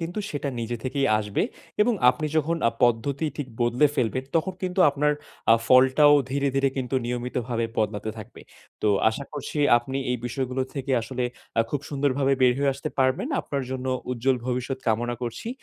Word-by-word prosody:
কিন্তু 170 Hz, +4 st, -4 dB
সেটা 145 Hz, -1 st, -3 dB
নিজে 115 Hz, +1 st, -3 dB
থেকেই 135 Hz, +1 st, 0 dB
আসবে। 105 Hz, -1 st, -1 dB, 0.4 s
এবং 235 Hz, +2 st, +2 dB, 0.2 s
আপনি 155 Hz, -, -4 dB
যখন 160 Hz, +2 st, +1 dB
আ -, -, 0 dB
পদ্ধতি 130 Hz, +6 st, +1 dB
ঠিক 145 Hz, -3 st, -4 dB
বদলে 120 Hz, +5 st, +4 dB
ফেলবেন 130 Hz, +1 st, 0 dB
তখন 180 Hz, +4 st, 0 dB
কিন্তু 185 Hz, +1 st, -1 dB
আপনার 150 Hz, +1 st, +1 dB, 0.4 s
আ -, -, +8 dB
ফলটাও 130 Hz, +3 st, +6 dB, 0.2 s
ধীরে, 140 Hz, +1 st, +1 dB
ধীরে 135 Hz, 0 st, +3 dB
কিন্তু 130 Hz, 0 st, -3 dB
নিয়মিতভাবে 120 Hz, -1 st, -2 dB
বদলাতে 105 Hz, 0 st, -1 dB
থাকবে। 110 Hz, -, -11 dB, 0.4 s
তো 105 Hz, -, +3 dB, 0.2 s
আশা 140 Hz, +5 st, -5 dB
করছি 150 Hz, +1 st, -5 dB, 0.2 s
আপনি 130 Hz, +3 st, -5 dB
এই 125 Hz, -, +1 dB
বিষয়গুলো 130 Hz, +2 st, -2 dB
থেকে 135 Hz, -1 st, -3 dB
আসলে 125 Hz, +1 st, -3 dB, 0.3 s
আ -, -, +7 dB
খুব 145 Hz, -, -1 dB
সুন্দরভাবে 140 Hz, -1 st, +1 dB
বের 125 Hz, -1 st, +6 dB
হয়ে 140 Hz, 0 st, +2 dB
আসতে 140 Hz, +3 st, -4 dB
পারবেন। 130 Hz, -, +2 dB
আপনার 140 Hz, -2 st, -3 dB
জন্য 130 Hz, 0 st, -4 dB, 0.2 s
উজ্জ্বল 125 Hz, +1 st, +1 dB
ভবিষ্যৎ 125 Hz, +1 st, -2 dB
কামনা 120 Hz, +2 st, +1 dB
করছি। 120 Hz, -, -4 dB
130 Hz, 175 wpm, -25 LUFS, 120-140 Hz, 0.4 s, আ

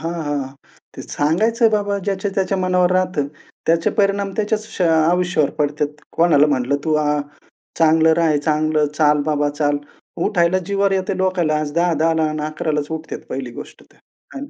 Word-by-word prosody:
हां, 165 Hz, +1 st, -3 dB
हां, 145 Hz, 0 st, -1 dB
हां. 135 Hz, +1 st, -9 dB, 0.4 s
ते -, -, -7 dB
सांगायचं 220 Hz, +10 st, +1 dB
बाबा 205 Hz, -1 st, 0 dB
ज्याच्या-त्याच्या 195 Hz, -1 st, -1 dB
मनावर 180 Hz, -1 st, +2 dB
राहतं. 180 Hz, -6 st, 0 dB, 0.4 s
त्याचे 165 Hz, 0 st, +2 dB
परिणाम 200 Hz, -1 st, +1 dB
त्याच्याच 215 Hz, 0 st, -1 dB
श -, -, -1 dB
अ 170 Hz, -, +3 dB, 0.2 s
आयुष्यावर 175 Hz, -4 st, +1 dB
पडतेत. 150 Hz, 0 st, 0 dB, 0.3 s
कोणाला 155 Hz, -3 st, +4 dB
म्हणलं 140 Hz, -1 st, 0 dB
"तू 155 Hz, -1 st, +1 dB
अ, 155 Hz, 0 st, +1 dB, 0.8 s
चांगलं 160 Hz, 0 st, +4 dB
राहा, 160 Hz, -3 st, +2 dB
चांगलं 155 Hz, 0 st, +1 dB
चाल, 150 Hz, -1 st, +3 dB
बाबा 145 Hz, -1 st, +1 dB
चाल." 145 Hz, 0 st, 0 dB, 0.5 s
उठायला 180 Hz, -3 st, +2 dB
जीवार 200 Hz, +1 st, +1 dB
येते 190 Hz, 0 st, -1 dB
लोकांला 185 Hz, -5 st, +1 dB
आज 150 Hz, -1 st, -3 dB
10-10 165 Hz, -1 st, +2 dB
ला 160 Hz, -1 st, +1 dB
अन् 155 Hz, 0 st, -4 dB
11 155 Hz, +1 st, -3 dB
लाच 150 Hz, -1 st, -1 dB
उठतात 160 Hz, 0 st, -5 dB
पहिली 130 Hz, -2 st, -5 dB
गोष्ट -, -, -11 dB
तर -, -, -27 dB
आहे 275 Hz, -, -14 dB
ना. 285 Hz, -, -17 dB
165 Hz, 175 wpm, -19 LUFS, 150-190 Hz, 0.8 s, कोणाला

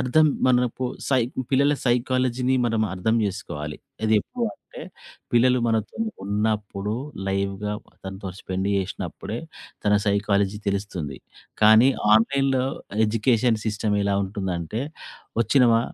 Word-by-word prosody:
అర్థం 140 Hz, +5 st, +4 dB, 0.2 s
మనపు 125 Hz, 0 st, +2 dB, 0.2 s
సై 130 Hz, -2 st, +3 dB, 0.3 s
పిల్లల 140 Hz, +2 st, +4 dB
సైకాలజీని 125 Hz, +1 st, +1 dB
మనం 115 Hz, -2 st, +1 dB
అర్థం 95 Hz, +5 st, 0 dB
చేసుకోవాలి. 75 Hz, -6 st, -4 dB, 0.3 s
అది 110 Hz, 0 st, +3 dB
ఎప్పుడు 245 Hz, -, -4 dB
అంటే, -, -, -13 dB, 0.5 s
పిల్లలు 125 Hz, +1 st, +4 dB
మనతో 110 Hz, -2 st, -1 dB, 0.3 s
ఉన్నప్పుడు 105 Hz, -1 st, -1 dB, 0.3 s
లైవ్‌గా 100 Hz, +1 st, -1 dB, 0.3 s
తనతో 95 Hz, +1 st, -6 dB
స్పెండ్ 95 Hz, +1 st, -3 dB
చేసినప్పుడే, 100 Hz, +3 st, -4 dB, 0.5 s
తన 105 Hz, 0 st, +4 dB
సైకాలజీ 100 Hz, 0 st, +1 dB
తెలుస్తుంది. 95 Hz, -8 st, -3 dB, 0.5 s
కానీ, 110 Hz, +4 st, +7 dB, 0.3 s
ఆన్‌లైన్‌లో 135 Hz, +3 st, +2 dB, 0.4 s
ఎడ్యుకేషన్ 115 Hz, +1 st, +2 dB
సిస్టమ్ 105 Hz, -1 st, 0 dB
ఎలా 100 Hz, 0 st, +1 dB
ఉంటుందంటే 95 Hz, 0 st, -3 dB, 0.6 s
వచ్చినమా, 115 Hz, -1 st, +4 dB
110 Hz, 105 wpm, -24 LUFS, 100-125 Hz, 0.6 s, కానీ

